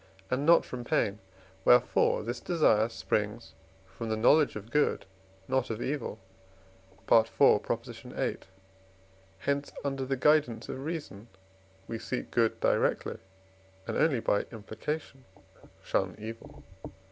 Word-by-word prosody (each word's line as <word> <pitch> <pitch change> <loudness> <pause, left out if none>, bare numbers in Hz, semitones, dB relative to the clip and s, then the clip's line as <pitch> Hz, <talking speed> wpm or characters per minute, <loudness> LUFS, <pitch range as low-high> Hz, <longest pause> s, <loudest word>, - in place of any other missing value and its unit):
and 135 +4 0
not 170 - +6
from 125 -1 -6
pain; 105 -3 0 0.4
wherefore 125 -1 +4
this 120 +2 -4
desire 115 -9 +3
springs 110 0 -2 0.3
from 110 +4 -7
the 110 - 0
knowledge 145 +6 +4
of 105 +2 -8
good, 150 0 +1 0.4
not 130 -1 0
of 110 -1 -3
evil 135 -4 -3 0.9
(IV. 115 -1 +5
viii.); - - +1 1.0
hence 140 +8 -2
under 135 -1 -2
the 135 +1 -2
guidance 145 -5 +2
of 130 - -5
reason 145 -10 -6 0.6
we 115 - -4
seek 125 - -4
good 115 -2 +1
directly - - +1 0.7
and - - -4
only 145 -7 +3
by 105 - +1
implication 130 +6 -6 0.6
shun 95 -2 -1
evil. 110 +2 -9
120 Hz, 120 wpm, -29 LUFS, 110-140 Hz, 1.0 s, not